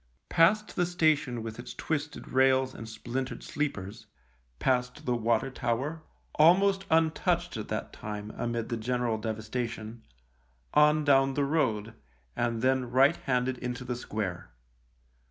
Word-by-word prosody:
Past 205 +6 +3
the 175 -1 +1
station 155 -9 +1
with 115 0 -7
its 120 - -8
twisted 155 -1 -3
rails 130 0 +3
and 110 - -8
splintered 125 +4 -4
sleepers, 110 - -4 0.5
past 125 - 0
the 125 - +1
water 115 +3 +1
tower, 135 +7 -2 0.3
almost 195 +5 +4
untouched 165 +2 +1
at 110 -2 -5
that 110 - -4
time 105 0 -6
amid 120 -1 -3
the 115 - -1
general 120 -1 -1
devastation, 110 +1 -4 0.7
on 150 +1 +5
down 135 -2 +4
the 145 - +1
road, 115 -8 0 0.4
and 115 -1 -1
then 130 -1 +2
right 135 +6 +4
handed 125 -1 -1
into 125 +1 -4
the 125 0 -2
square. 100 - -4
125 Hz, 135 wpm, -29 LUFS, 115-150 Hz, 0.7 s, on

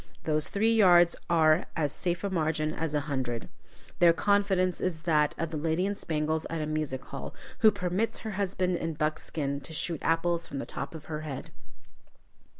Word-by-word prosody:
Those 155 -1 0
three 220 +3 +2
yards 175 -5 +6
are 160 0 +4
as 150 -3 0
safe 175 0 -2
a 200 - -1
margin 155 -3 0
as 160 -2 -2
a 145 - +2
hundred. 130 -5 -3 0.5
Their 170 -1 +7
confidence 195 -1 +2
is 165 -3 -2
that 150 -3 +2
of 165 -1 -3
the 160 - -3
lady 160 +4 0
in 200 - 0
spangles 155 -3 -1
at 165 - -3
a 155 - -1
music 150 -4 -2
hall, - - -7 0.2
who 220 -4 +7
permits 200 +2 -1
her 220 - -2
husband 185 -2 0
in 165 -2 -3
buckskin 155 -2 -2
to 160 - -9
shoot 165 0 -1
apples 165 +1 +1
from 140 - -6
the - - -3
top - - -6
of 155 - -9
her 155 -1 -4
head. 145 -4 -6
165 Hz, 185 wpm, -29 LUFS, 155-180 Hz, 0.5 s, Their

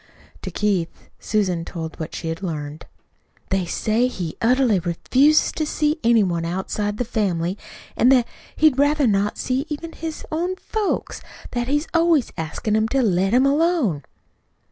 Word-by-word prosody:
To - - -5
Keith 195 -5 -2
Susan 185 -6 0
told 160 -1 -7
what 160 0 -5
she 165 - -4
had 165 +2 -4
learned. 155 -4 -5 0.6
"They 190 -2 0
say 220 +7 +1
he 175 -10 -5
utterly 245 -3 +3
refuses 260 - +3
to 315 - -2
see 305 +1 0
any 230 -2 +5
one 170 -3 -1
outside 190 +4 -2
the 245 - -1
family; 190 -6 -1 0.4
an' 245 - +4
that 250 -3 +4 0.3
he'd 300 -4 +3
rather 290 0 +3
not 205 -2 +1
see 265 +4 -1
even 320 +2 -5
his 320 -1 -6
own 350 +4 -1
folks 415 +1 -3 0.3
that 240 -1 -2
he's 295 +3 0
always 330 -6 +3
askin' 165 +7 -2
'em 220 0 +2
to 270 +2 +1
let 195 -2 +2
him 255 +3 +4
alone." 285 - +2
225 Hz, 160 wpm, -22 LUFS, 180-290 Hz, 0.6 s, any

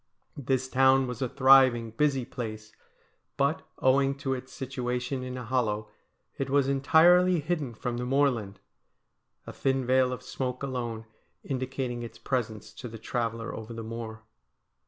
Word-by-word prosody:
This 130 -1 -1
town 130 0 +4
was 125 0 -6
a 130 - 0
thriving, 130 -4 +5
busy 135 +1 +1
place; 110 -4 -6 0.7
but, 140 +3 +1 0.2
owing 135 +1 +3
to 135 -1 -2
its 130 0 -6
situa 125 -2 -3
tion 130 +1 -4
in 125 0 -5
a 125 - -6
hollow, 110 -4 -1 0.5
it 135 -1 -2
was 140 0 +3
entirely 170 +6 +5
hidden 150 -6 -2
from 120 +1 -3
the 120 - -3
moorland, 125 -8 +1 0.9
a - - -8
thin 135 -1 0
veil 130 0 +3
of 125 - -5
smoke 125 0 -4
alone 120 -4 -4 0.4
indicating 130 -2 -3
its 115 -1 -8
presence 115 -5 -3
to 125 - -8
the 115 -1 -8
traveller 115 0 -3
over 110 +1 -7
the 115 - -5
moor. 110 -1 -7
130 Hz, 155 wpm, -28 LUFS, 115-135 Hz, 0.9 s, thriving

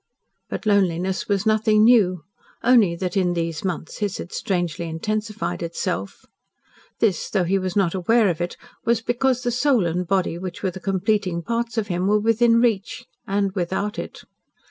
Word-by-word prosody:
But - - -5
loneliness 190 -2 +1
was 200 0 +1
nothing 215 0 +3
new, 195 -8 +4 0.4
only 225 -8 +5
that 180 +2 -3
in 180 -2 +2
these 165 -2 -3
months 180 -4 -4
his 205 -2 -2
had - - -8
strangely 175 -3 -2
intensified 215 +6 -3
itself. 165 - -4 0.7
This, 200 -7 0
though 195 -3 +1
he 190 +3 +1
was 185 -1 -3
not 190 -5 +2
aware 215 +4 +3
of 175 -2 -1
it, 175 - -3 0.3
was 230 -1 +1
because 250 +1 0
the 245 - 0
soul 250 -4 +2
and 175 +1 -1
body 185 -2 0
which 185 0 -7
were 190 - 0
the 190 - -9
completing 190 -2 0
parts 230 +1 -2
of 220 - +1
him 180 +1 0
were 210 +1 +3
within 230 +2 +3
reach 225 -5 0 0.2
and 200 0 0
without 190 +2 -2
it. - - -7
195 Hz, 170 wpm, -23 LUFS, 175-220 Hz, 0.7 s, only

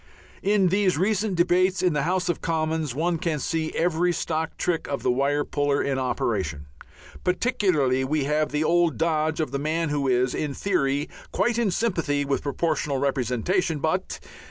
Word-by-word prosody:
In 200 -2 +3
these 190 -2 +2
recent 205 +2 +1
debates 185 +2 +2
in 180 -3 +3
the 150 - +1
House 180 +4 0
of 175 - -1
Commons 160 -4 -1
one 165 +2 0
can 170 -4 -1
see 160 +2 -2
every 175 +1 +1
stock 160 -1 -2
trick 170 -2 -1
of 140 - -3
the 125 - +3
wire 140 +3 +1
puller 145 -1 0
in 135 -1 0
operation. 95 - -2 0.6
Particularly 180 - +1
we 145 +2 0
have 150 +2 0
the 150 +1 0
old 170 0 +2
dodge 160 -1 0
of 155 - -1
the 140 - -2
man 160 +2 -1
who 145 -2 0
is 125 0 +2
"in 145 -3 -3
theory 145 -7 0 0.2
quite 235 0 +1
in 230 -4 +2
sympathy 165 -9 0
with 140 0 -1
Proportional 145 -1 -1
Representation, 140 - 0
but 160 +6 -2
155 Hz, 170 wpm, -25 LUFS, 140-180 Hz, 0.6 s, In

